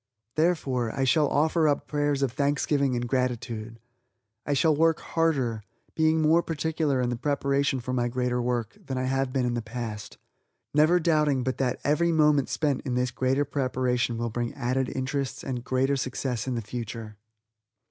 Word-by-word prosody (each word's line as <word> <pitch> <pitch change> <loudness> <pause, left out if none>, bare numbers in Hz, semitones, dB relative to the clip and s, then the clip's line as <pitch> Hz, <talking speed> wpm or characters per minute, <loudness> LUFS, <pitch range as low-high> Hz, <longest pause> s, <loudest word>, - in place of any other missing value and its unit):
Therefore, 135 -8 +1
I 135 - -1
shall 150 +3 +3
offer 160 +2 +2
up 145 -1 +1
prayers 145 -2 0
of 135 - +1
thanksgiving 140 0 +1
and 120 0 -2
gratitude; 115 -3 -2 0.7
I 145 - +1
shall 155 +2 +3
work 165 +1 +3
harder, 135 -9 0 0.3
being 160 0 +2
more 160 +3 +5
particular 160 -3 -1
in 125 0 0
the - - -1
preparation 140 +1 0
for 125 +1 -4
my 120 -1 +1
greater 125 0 -1
work, 120 -2 -2
than 130 - -4
I 130 - -1
have 135 0 0
been 130 -1 0
in 120 - 0
the 120 - -1
past 110 -3 -6 0.6
never 155 +4 +5
doubting 150 -5 +2
but 130 +1 -2
that 130 -2 0
every 165 +4 +2
moment 150 -4 +3
spent 145 -4 0
in 125 -3 -3
this 125 0 0
greater 130 +3 +1
preparation 125 -3 0
will 120 0 -2
bring 120 +1 -3
added 130 +1 -1
interests, 135 +1 -3
and 130 -2 -3
a - - -10
greater 130 +3 +1
success 130 -2 -3
in 130 - -1
the 115 - -3
future. 110 -1 -6
130 Hz, 180 wpm, -27 LUFS, 120-145 Hz, 0.7 s, more